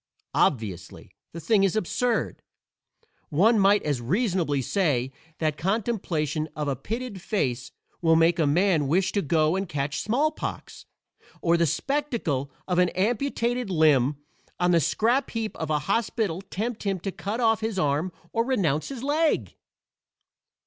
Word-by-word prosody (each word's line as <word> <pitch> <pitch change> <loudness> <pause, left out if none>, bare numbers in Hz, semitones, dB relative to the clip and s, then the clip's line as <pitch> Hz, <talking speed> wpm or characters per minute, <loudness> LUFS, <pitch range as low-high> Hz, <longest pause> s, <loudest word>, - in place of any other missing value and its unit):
Obviously, 105 - -1 0.2
the 170 - -7
thing 205 +3 +2
is 195 0 +2
absurd; 230 +4 -1 0.9
one 205 +9 +4
might 200 +1 +4
as 145 -5 -1
reasonably 175 - 0
say 135 - 0 0.3
that 155 -2 -1
contemplation 170 - -1
of 150 -1 -3
a 140 - 0
pitted 215 - -5
face 130 - -2 0.3
will 165 -1 +4
make 165 +2 +3
a 155 - +3
man 165 -1 +2
wish 180 +6 +2
to 200 - 0
go 155 +1 +2
and 190 -2 -2
catch 145 -2 -2
smallpox, 280 +8 -2 0.5
or 170 0 +2
the 170 -1 +2
spectacle 215 - -1 0.2
of 180 -1 +1
an 180 0 +4
amputated 240 +2 0
limb 150 -5 +3 0.4
on 175 0 +3
the 170 - +5
scrap 240 - +1
heap 225 -2 -3
of 160 - -4
a 155 - +2
hospital 200 -4 0
tempt 210 +4 -4
him 195 -2 -1
to 195 - -3
cut 205 +5 -4
off 225 -2 +3
his 220 -2 -2
arm 150 +2 0 0.2
or 230 - +2
renounce 185 - 0
his 265 -3 -7
leg. 305 +3 +1
185 Hz, 150 wpm, -26 LUFS, 155-225 Hz, 0.9 s, the